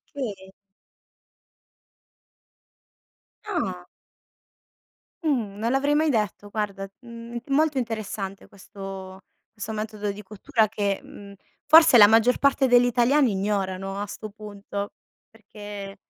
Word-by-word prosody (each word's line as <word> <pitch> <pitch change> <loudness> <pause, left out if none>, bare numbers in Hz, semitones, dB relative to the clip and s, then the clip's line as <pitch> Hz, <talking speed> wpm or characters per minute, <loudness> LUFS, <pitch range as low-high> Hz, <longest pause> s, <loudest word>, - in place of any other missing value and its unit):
Okay. 200 -8 -5 2.9
Ah! 190 - -3 1.4
Mh, 235 -10 0
non 230 +3 -1
l'avrei 285 +2 +2
mai 310 0 +3
detto, 210 -3 -1
guarda, 200 -2 -3
mhmm, 235 0 -8
molto 290 +1 +2
interessante 215 -4 -4
questo 195 -1 -9 0.4
questo 215 +2 -5
metodo 210 -1 -3
di 205 +1 -9
cottura 215 +2 0
che, 200 -2 -1
mhmm, 200 -1 -12 0.3
forse 315 -3 +8
la 205 - +10
maggior 225 +3 +4
parte 275 -1 +3
degli 245 0 +5
italiani 245 +1 +3
ignorano 195 -1 -2
a 205 - -2
'sto 215 +1 -8
punto, 205 -1 -7 0.4
perché 205 -2 -10
210 Hz, 110 wpm, -25 LUFS, 200-245 Hz, 2.9 s, la